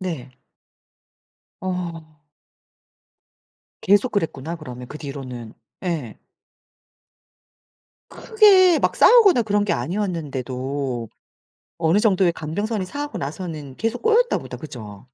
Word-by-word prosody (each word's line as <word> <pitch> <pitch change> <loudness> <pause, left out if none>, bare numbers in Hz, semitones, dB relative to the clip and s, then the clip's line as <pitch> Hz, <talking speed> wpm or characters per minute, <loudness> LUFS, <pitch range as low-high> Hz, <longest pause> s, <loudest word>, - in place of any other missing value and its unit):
네. 160 -9 -5 1.3
어. 170 -4 -5 1.6
계속 205 +6 +3
그랬구나, 165 -4 -2
그러면 125 -5 -9
그 150 - -8
뒤로는. 130 -5 -7 0.3
예. 150 -11 -3 1.9
크게 390 -6 +5
막 - - +1
싸우거나 400 - +6
그런 205 -1 +1
게 205 - 0
아니었는데도 135 - -3 0.7
어느정도의 185 +2 +3
감정선이 195 +6 -3
상하고 290 +8 -5
나서는 150 -2 -6
계속 225 +2 -2
꼬였나 460 +2 +3
보다. - - -8
그죠? 110 -10 -9
170 Hz, 220 characters per minute, -22 LUFS, 140-210 Hz, 1.9 s, 싸우거나